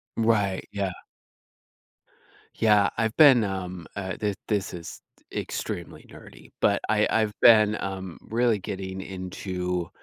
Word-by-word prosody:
Right, 105 Hz, -4 st, +1 dB
yeah. 100 Hz, -2 st, -2 dB, 1.6 s
Yeah, 105 Hz, -2 st, +4 dB
I've 115 Hz, -1 st, 0 dB
been, 135 Hz, -7 st, +7 dB
um, 90 Hz, -3 st, -5 dB
uh, 95 Hz, -2 st, -4 dB
thi 105 Hz, -1 st, 0 dB
this 100 Hz, -4 st, -1 dB
is 85 Hz, -1 st, -8 dB, 0.3 s
extremely -, -, -5 dB
nerdy, -, -, -15 dB
but, 100 Hz, -, +3 dB
I 105 Hz, -1 st, +3 dB
I've 110 Hz, -2 st, +1 dB
been, 110 Hz, -2 st, +6 dB
um, 95 Hz, -2 st, -5 dB
really 115 Hz, -2 st, +2 dB
getting 95 Hz, 0 st, -5 dB
into 90 Hz, -2 st, -4 dB
100 Hz, 120 wpm, -26 LUFS, 95-110 Hz, 1.6 s, been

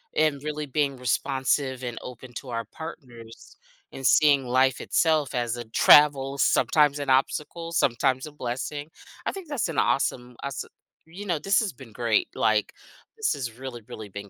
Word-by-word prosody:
and 150 Hz, -3 st, +1 dB
really 150 Hz, -1 st, -4 dB
being 140 Hz, -1 st, 0 dB
responsive 130 Hz, +1 st, 0 dB
and 120 Hz, -1 st, -4 dB
open 125 Hz, 0 st, -10 dB
to 130 Hz, -, -7 dB
our 115 Hz, -1 st, -3 dB
partners 120 Hz, -4 st, -11 dB, 0.3 s
and 135 Hz, -, -7 dB
seeing 140 Hz, -4 st, +5 dB
life 130 Hz, +1 st, +2 dB
itself 155 Hz, -4 st, +1 dB
as 120 Hz, -1 st, -1 dB
a 120 Hz, -, -5 dB
travel, 140 Hz, +3 st, +5 dB
sometimes 145 Hz, 0 st, +3 dB
an 140 Hz, -2 st, -4 dB
obstacle, 150 Hz, +5 st, 0 dB
sometimes 130 Hz, -2 st, +1 dB
a -, -, -10 dB
blessing. 145 Hz, +3 st, -5 dB, 0.4 s
I -, -, 0 dB
think 385 Hz, -4 st, -9 dB
that's 275 Hz, -10 st, -1 dB
an 160 Hz, -, -1 dB
awesome, 125 Hz, -2 st, 0 dB
aweso 140 Hz, -3 st, -4 dB, 0.4 s
you 190 Hz, +5 st, -9 dB
know, 170 Hz, -5 st, -1 dB
this 195 Hz, +6 st, +2 dB
has 210 Hz, -, -2 dB
been 120 Hz, -2 st, -13 dB
great, 115 Hz, -1 st, +1 dB
like, 110 Hz, -1 st, +1 dB, 0.5 s
this 440 Hz, -, +1 dB
has 120 Hz, -4 st, -5 dB
really, 130 Hz, -3 st, -7 dB
really 110 Hz, -4 st, -9 dB
been 100 Hz, +1 st, -8 dB
135 Hz, 170 wpm, -26 LUFS, 120-150 Hz, 0.5 s, seeing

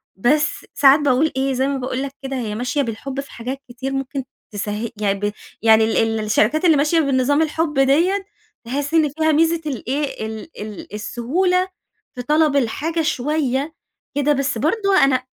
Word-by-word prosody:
بس 295 Hz, +9 st, +1 dB
ساعات 280 Hz, 0 st, +6 dB
باقول 290 Hz, +2 st, +2 dB
إيه، 270 Hz, 0 st, +1 dB
زي 260 Hz, +1 st, +1 dB
ما 280 Hz, -, -1 dB
باقول 255 Hz, +1 st, -3 dB
لَك 275 Hz, -, -4 dB
كده، 270 Hz, 0 st, -4 dB
هي 220 Hz, -4 st, -3 dB
ماشية 250 Hz, +5 st, -1 dB
بالحب 260 Hz, +3 st, -4 dB
في 275 Hz, -, -6 dB
حاجات 255 Hz, +4 st, -6 dB
كتير 260 Hz, +2 st, -5 dB
ممكن 270 Hz, 0 st, -3 dB, 0.3 s
تسه 210 Hz, +2 st, -3 dB
يعني 200 Hz, -2 st, 0 dB
ب 205 Hz, 0 st, -1 dB, 0.3 s
يعني 220 Hz, -1 st, +6 dB
ال 225 Hz, 0 st, +1 dB
الشركات 215 Hz, -, +2 dB
اللي 320 Hz, -4 st, +5 dB
ماشية 305 Hz, +4 st, +2 dB
بنظام 275 Hz, 0 st, +2 dB
الحب 315 Hz, -2 st, 0 dB
دِيّة، 345 Hz, +9 st, +3 dB, 0.4 s
تحس 285 Hz, +5 st, -3 dB
إن 315 Hz, -3 st, +4 dB
فيها 315 Hz, +2 st, +1 dB
ميزة 325 Hz, +2 st, +2 dB
الإيه، 275 Hz, -2 st, -3 dB
ال 220 Hz, +5 st, -8 dB
ال 210 Hz, -1 st, -8 dB
السهولة 350 Hz, -, 0 dB, 0.5 s
في 250 Hz, -, -4 dB
طلب 300 Hz, +1 st, +2 dB
الحاجة 305 Hz, +6 st, 0 dB
شويّة 295 Hz, 0 st, -1 dB, 0.4 s
كده 290 Hz, +1 st, +2 dB
بس 275 Hz, -3 st, -1 dB
برضو 395 Hz, -, +1 dB
أنا 255 Hz, -2 st, +3 dB
275 Hz, 170 wpm, -20 LUFS, 240-305 Hz, 0.5 s, ساعات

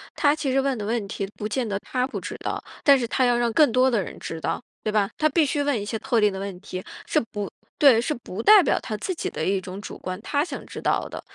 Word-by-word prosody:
她 290 Hz, -2 st, +4 dB
其 295 Hz, -3 st, -2 dB
实 270 Hz, +1 st, +3 dB
问 270 Hz, -1 st, 0 dB
的 210 Hz, -, -4 dB
问 225 Hz, 0 st, -1 dB
题 195 Hz, 0 st, -4 dB
不 210 Hz, -, -3 dB
见 240 Hz, +2 st, -1 dB
得 200 Hz, -2 st, -1 dB
她 250 Hz, +4 st, -1 dB
不 275 Hz, -, -5 dB
知 -, -, -6 dB
道， -, -, -3 dB, 0.2 s
但 280 Hz, -1 st, +7 dB
是 250 Hz, -, -1 dB
她 255 Hz, +2 st, +2 dB
要 245 Hz, -1 st, +3 dB
让 240 Hz, -1 st, +1 dB
更 290 Hz, +3 st, +5 dB
多 255 Hz, +1 st, +4 dB
的 230 Hz, -4 st, +2 dB
人 -, -, -7 dB
知 165 Hz, -, -5 dB
道， -, -, -2 dB, 0.2 s
对 215 Hz, -, 0 dB
吧？ 205 Hz, -2 st, +2 dB
她 310 Hz, -, +3 dB
必 320 Hz, 0 st, +3 dB
须 290 Hz, +1 st, 0 dB
问 285 Hz, -5 st, +1 dB
一 205 Hz, -, -5 dB
些 220 Hz, +1 st, -3 dB
特 230 Hz, -2 st, +1 dB
定 210 Hz, -1 st, +4 dB
的 190 Hz, -, -5 dB
问 195 Hz, -2 st, -5 dB
题， 185 Hz, -2 st, -6 dB, 0.2 s
是 -, -, +2 dB
不 205 Hz, -2 st, -3 dB, 0.3 s
对， 265 Hz, -6 st, +7 dB
是 275 Hz, +6 st, 0 dB
不 225 Hz, -5 st, -6 dB
代 415 Hz, -, +8 dB
表， -, -, +2 dB
她 220 Hz, -, -5 dB
自 370 Hz, -, -3 dB
己 335 Hz, -, -3 dB
的 -, -, -4 dB
一 195 Hz, 0 st, +1 dB
种 185 Hz, +2 st, -8 dB
主 -, -, -8 dB
观， 185 Hz, 0 st, -5 dB
她 285 Hz, +6 st, 0 dB
想 -, -, -7 dB
知 -, -, -8 dB
道 -, -, 0 dB
的。 -, -, -7 dB
235 Hz, 305 characters per minute, -24 LUFS, 205-275 Hz, 0.3 s, 代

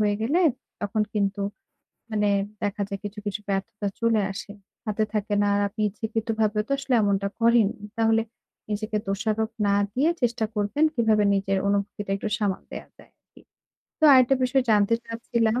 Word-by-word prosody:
হয়ে 205 Hz, -1 st, +2 dB
গেলে 290 Hz, +11 st, +2 dB, 0.4 s
তখন 210 Hz, +1 st, 0 dB
কিন্তু 200 Hz, -1 st, 0 dB, 0.7 s
মানে 210 Hz, -1 st, +1 dB, 0.3 s
দেখা 205 Hz, +1 st, -1 dB
যায় 200 Hz, -, -4 dB
কিছু, 205 Hz, +1 st, -6 dB
কিছু 205 Hz, +1 st, -2 dB
ব্যর্থতা 200 Hz, +1 st, -2 dB
চলে 230 Hz, -2 st, +3 dB
আসে। 205 Hz, +1 st, -7 dB, 0.3 s
হাতে 215 Hz, 0 st, 0 dB
থাকে 210 Hz, -1 st, -1 dB
না -, -, +2 dB
আর 200 Hz, -, +2 dB
আপনি 215 Hz, +2 st, -9 dB
ইচ্ছাকৃতভাবেও 220 Hz, 0 st, -1 dB
তো -, -, -1 dB
আসলে 270 Hz, -2 st, -1 dB
এমনটা 200 Hz, -1 st, +1 dB
করেননি। 230 Hz, -2 st, +3 dB
তাহলে 225 Hz, 0 st, +3 dB, 0.5 s
নিজেকে 215 Hz, +1 st, -2 dB
দোষারোপ 220 Hz, +2 st, -1 dB, 0.2 s
না 200 Hz, -, +3 dB, 0.2 s
দিয়ে 285 Hz, +8 st, +2 dB
চেষ্টা 235 Hz, -2 st, +1 dB
করবেন 210 Hz, +8 st, +1 dB
কিভাবে 220 Hz, -3 st, +3 dB
নিজের 195 Hz, 0 st, 0 dB
অনুভূতিটা 200 Hz, 0 st, -2 dB
একটু 210 Hz, -, -3 dB
সামাল 200 Hz, -4 st, -1 dB
দেওয়া -, -, -7 dB
যায় -, -, -18 dB
আরকি। -, -, -22 dB, 0.6 s
তো 315 Hz, -, +2 dB
আরেকটা 255 Hz, 0 st, +6 dB
বিষয় 260 Hz, +1 st, +2 dB
জানতে 210 Hz, +1 st, +4 dB
চাচ্ছিলাম 230 Hz, 0 st, 0 dB
215 Hz, 160 wpm, -25 LUFS, 205-230 Hz, 0.7 s, আরেকটা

